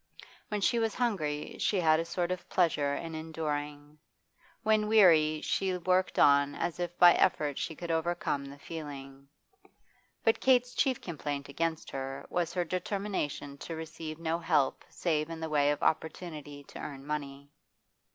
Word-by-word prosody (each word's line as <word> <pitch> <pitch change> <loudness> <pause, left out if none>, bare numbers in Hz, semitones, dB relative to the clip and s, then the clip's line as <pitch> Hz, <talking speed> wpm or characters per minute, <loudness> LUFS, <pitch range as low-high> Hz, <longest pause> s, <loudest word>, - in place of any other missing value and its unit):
When 210 -1 -2
she 235 +4 +2
was 225 -1 0
hungry 165 -12 -1
she 200 - +1
had 160 -2 +4
a 165 - -1
sort 175 +1 -2
of 185 - -5
pleasure 150 -5 +2
in 165 -1 -5
enduring; 150 -2 -4 0.6
when 215 -1 +3
weary 160 -8 +5
she 190 -2 0
worked 185 +1 +1
on 140 0 +5
as 175 -1 -3
if 175 0 -3
by 175 -1 +8
effort 150 -6 +1
she 160 - -3
could 170 +2 -5
overcome 165 -3 -1
the 140 +1 -10
feeling. 140 -3 -8 1.0
But 225 0 +3
Kate's 250 -1 +4
chief 265 -3 +1
complaint 145 -4 -4
against 160 +2 -2
her 135 0 -5
was 175 -2 0
her 180 -1 +1
determination 180 -6 -3
to 165 - -6
receive 160 -1 -7
no 165 0 -1
help 155 -5 +1
save 155 -2 -1
in 165 -1 -6
the 160 0 -4
way 145 -1 +3
of 145 - -1
opportunity 155 -3 -2
to - - -11
earn 135 -2 -7
money. 140 -1 -5
160 Hz, 160 wpm, -30 LUFS, 145-180 Hz, 1.0 s, by